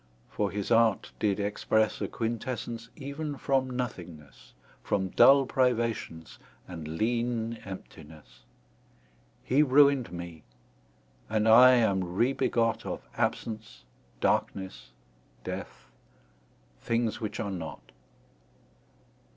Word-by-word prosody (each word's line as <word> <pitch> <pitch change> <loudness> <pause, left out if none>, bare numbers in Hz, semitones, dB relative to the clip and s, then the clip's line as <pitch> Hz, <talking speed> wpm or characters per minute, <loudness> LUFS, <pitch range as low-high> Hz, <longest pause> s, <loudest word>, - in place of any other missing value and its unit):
For 105 - -1
his 100 +1 -4
art 115 -3 +3
did 105 -1 +1
expresse 105 +1 0
A - - -1
quintessence 115 0 -4
even 145 +1 -5
from 135 -1 0
nothingnesse, 90 - -7 0.3
From 95 -1 -1
dull 135 +7 +6
privations, 115 -11 -1 0.3
and 80 -4 -7
leane 115 0 -1
emptinesse: 75 -9 -11 1.0
He 135 +4 +3
ruin'd 140 - +4
mee, 85 -2 -8 0.9
and 110 0 +1
I 125 +3 +8
am 95 -7 +1
re 120 +7 +2
begot 115 -4 0
Of - - -6
absence, 110 0 -3 0.4
darknesse, 95 -1 -1 0.5
death; - - -7 0.9
things 115 -1 -1
which 110 - -4
are 100 -2 -2
not. 80 -9 -7
110 Hz, 100 wpm, -28 LUFS, 95-125 Hz, 1.0 s, I